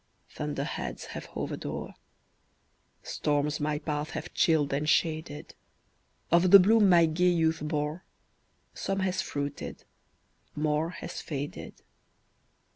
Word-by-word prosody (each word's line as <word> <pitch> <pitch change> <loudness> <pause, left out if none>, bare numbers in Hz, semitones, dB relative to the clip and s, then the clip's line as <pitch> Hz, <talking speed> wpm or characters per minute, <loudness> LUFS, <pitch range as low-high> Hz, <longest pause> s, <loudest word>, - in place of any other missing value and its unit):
Thunder - - -3
heads - - -5
have - - -6
hovered - - -5
o'er - - -5 1.1
Storms 145 0 -1
my 150 0 0
path 150 0 -3
have 155 +3 -7
chilled 155 -4 +2
and 150 +2 0
shaded; 155 -2 0 0.8
Of 170 +2 +5
the 200 +2 +11
bloom 205 +2 +5
my 170 -2 +6
gay 175 +3 +2
youth 165 -2 +2
bore, 150 +2 -2 0.7
Some 195 0 -2
has 185 -1 0
fruited 145 0 -5 0.7
more 150 +2 0
has 175 - -7
faded." 145 -1 -6
155 Hz, 120 wpm, -29 LUFS, 150-175 Hz, 1.1 s, the